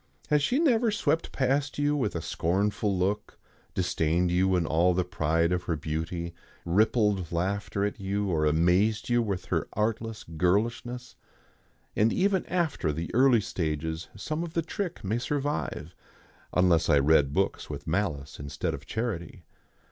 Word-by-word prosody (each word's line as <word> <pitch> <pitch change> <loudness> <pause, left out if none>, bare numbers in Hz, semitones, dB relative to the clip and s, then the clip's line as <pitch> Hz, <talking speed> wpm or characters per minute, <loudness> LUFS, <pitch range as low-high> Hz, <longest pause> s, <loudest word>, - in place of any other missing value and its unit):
Has 150 -1 +4
she 245 - +1
never 245 -7 +3
swept 205 -6 0
past 135 +1 0
you 145 0 +2
with 120 -10 -1
a 85 - -3
scornful 100 +4 0
look, 100 +3 -1 0.4
disdained 90 -1 +1
you 95 +1 +3
in 90 -2 +1
all 85 +3 +3
the 90 - +2
pride 85 -1 +1
of 90 -1 -1
her 85 - 0
beauty, 80 +3 -4 0.3
rippled 105 0 +2
laughter 100 +3 -1
at 105 +1 -3
you, 100 +1 -1
or 80 -4 +1
amazed 90 +9 +2
you 120 0 +3
with 100 -5 -3
her - - -1
artless 110 +1 -2
girlishness? 115 +9 -1 0.8
And 110 +2 +3
even 190 0 +1
after 165 - 0
the 80 +3 -5
early 125 -1 +5
stages 80 -2 -3
some 155 - -3
of 170 -2 -6
the 165 - 0
trick 180 +1 -4
may 105 +5 0
survive, 135 - -2 0.6
unless 90 -2 +3
I 75 - +6
read 70 0 +4
books 95 +6 -1
with - - -6
malice 80 -6 -2
instead 70 -1 -3
of - - -8
charity. 95 -7 -4
95 Hz, 155 wpm, -28 LUFS, 85-120 Hz, 0.8 s, I